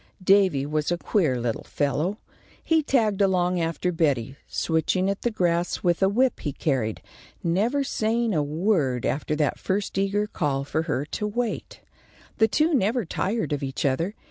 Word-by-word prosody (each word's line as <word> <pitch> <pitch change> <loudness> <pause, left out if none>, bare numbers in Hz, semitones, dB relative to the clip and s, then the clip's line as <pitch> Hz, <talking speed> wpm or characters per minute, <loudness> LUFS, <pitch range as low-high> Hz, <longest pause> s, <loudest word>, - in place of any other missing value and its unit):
Davy 185 -8 +4
was 150 +2 -1
a 175 - +1
queer 160 - +1
little 120 -1 -2
fellow. 150 +7 -1 0.5
He 325 -1 +3
tagged 220 -8 +1
along 180 -2 +2
after 165 +2 -1
Betty, 140 -7 0
switching 180 +4 0
at 200 - -5
the 240 - +1
grass 175 -5 0
with 175 0 +2
a 190 - +4
whip 250 +5 +2
he 145 - -3
carried, 125 -9 -1 0.4
never 215 +12 +1
saying 230 -2 0
a 155 - +2
word 150 - 0
after 150 +2 -1
that 150 -2 0
first 195 0 -1
eager 200 +2 +1
call 140 -9 -1
for 155 +3 -1
her 140 - 0
to 210 +7 -3
wait. 235 +2 -3 0.6
The 220 - +6
two 310 +8 +2
never 235 -2 +1
tired 195 +1 -1
of 145 - -2
each 135 0 -3
other. 165 +10 0
180 Hz, 170 wpm, -25 LUFS, 150-210 Hz, 0.6 s, The